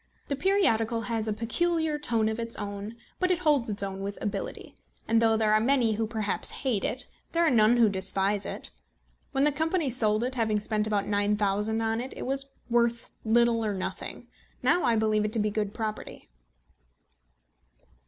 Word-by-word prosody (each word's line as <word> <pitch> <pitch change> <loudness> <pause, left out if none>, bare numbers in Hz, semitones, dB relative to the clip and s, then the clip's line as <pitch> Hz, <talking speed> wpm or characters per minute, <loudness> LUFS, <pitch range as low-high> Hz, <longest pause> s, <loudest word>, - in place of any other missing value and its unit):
The 280 - 0
periodical 265 - +2
has 225 -1 -2
a - - 0
peculiar 310 +8 0
tone 230 -6 +1
of 220 +1 -2
its 230 0 -3
own; 205 +1 -6 0.2
but 365 - +1
it 365 - +2
holds 295 -9 +2
its 205 -1 -3
own 195 0 -4
with 200 +1 -4
ability, 205 - -4 0.3
and 230 0 +3
though 225 -1 +4
there 215 -1 +2
are 215 - +5
many 240 -1 +2
who 220 +1 -1
perhaps 215 -3 -1 0.2
hate 225 -7 +1
it, 260 - 0 0.3
there 335 0 +3
are 320 - +3
none 230 0 +5
who 235 -2 +6
despise 195 +1 +1
it. - - -7 0.6
When 270 - +1
the 295 - +4
company 315 0 0
sold 220 -2 +2
it, 255 +1 -2
having 220 -4 +1
spent 210 0 -1
about 205 -2 0
£9000 210 +1 0
on 225 +1 0
it, 260 - -7
it - - -5
was 275 +1 -2 0.2
worth 235 0 +1
little 230 0 +3
or 210 -2 -1
nothing. 185 - -5 0.4
Now 355 - +3
I 235 - +3
believe 215 -1 +2
it 210 0 -2
to - - +4
be 215 -1 +1
a - - -6
good 210 -1 -1
property. 215 -1 -5
225 Hz, 190 wpm, -28 LUFS, 210-250 Hz, 0.6 s, who